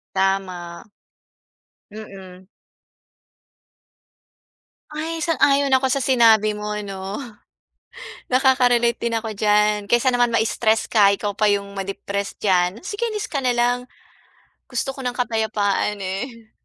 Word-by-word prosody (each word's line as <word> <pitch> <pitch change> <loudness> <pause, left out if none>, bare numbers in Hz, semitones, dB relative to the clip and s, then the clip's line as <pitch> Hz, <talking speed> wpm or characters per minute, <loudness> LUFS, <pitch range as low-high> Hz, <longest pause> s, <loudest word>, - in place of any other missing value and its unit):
Tama. 190 0 -2 1.0
Mhm. 190 -3 -11 2.4
Ay, 320 +2 -4
sang-ayon 285 -3 +2
ako 260 -1 0
sa 275 - 0
sinabi 225 -5 +4
mo 210 0 -4
'no. 195 +2 -6 1.1
Nakaka-relate 250 -3 +3
din 235 -1 -3
ako 225 0 -2
diyan. 210 0 +2
Kaysa 240 +4 +2
naman 245 -1 +1
ma-stress 220 0 +1
ka. 200 -3 +5
Ikaw 205 0 -4
pa 215 - +2
yung 200 0 -3
ma-depress 200 +1 -4
dyan. 185 +2 +1
Sige 420 +3 -3
alis 425 -2 -4
ka 285 - -3
nalang. 245 0 +1 0.8
Gusto 255 +1 -2
ko 270 - -12
ng 250 -2 -3
kapayapaan, 215 -4 0
eh. 220 +4 -6
220 Hz, 110 wpm, -21 LUFS, 200-250 Hz, 2.4 s, ka